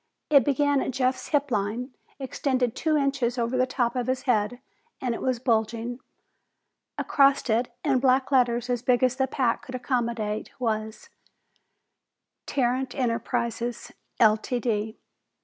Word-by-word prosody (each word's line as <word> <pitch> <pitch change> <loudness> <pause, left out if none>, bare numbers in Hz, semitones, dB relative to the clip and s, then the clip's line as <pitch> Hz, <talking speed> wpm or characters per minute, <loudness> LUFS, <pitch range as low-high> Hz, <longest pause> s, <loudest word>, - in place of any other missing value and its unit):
It 280 -3 +7
began 285 +1 +2
at - - -2
Jeff's 255 0 -1
hip 285 -2 0
line, 225 +5 -2 0.2
extended 260 -3 -1
two 310 -1 +1
inches 275 -4 0
over 235 +1 -1
the 255 0 +2
top 245 -2 -1
of 250 -1 -1
his 260 0 -1
head, 240 -1 +1 0.4
and 250 -2 -1
it - - -5
was 255 -2 0
bulging. 235 0 -1 1.0
Across 275 -3 +3
it, 240 +3 +1
in 270 -3 +3
black 260 +1 +2
letters 245 -2 +2
as 245 -2 -1
big 250 0 +2
as 255 0 +3
the 265 -1 +1
pack 250 -3 -1
would 255 - -6
accommodate, 235 -4 -2
was: 220 -2 -3 1.4
TARRANT 255 -1 0
ENTERPRISES 235 -1 -2 0.3
Ltd. 220 0 +1
245 Hz, 135 wpm, -26 LUFS, 235-260 Hz, 1.4 s, It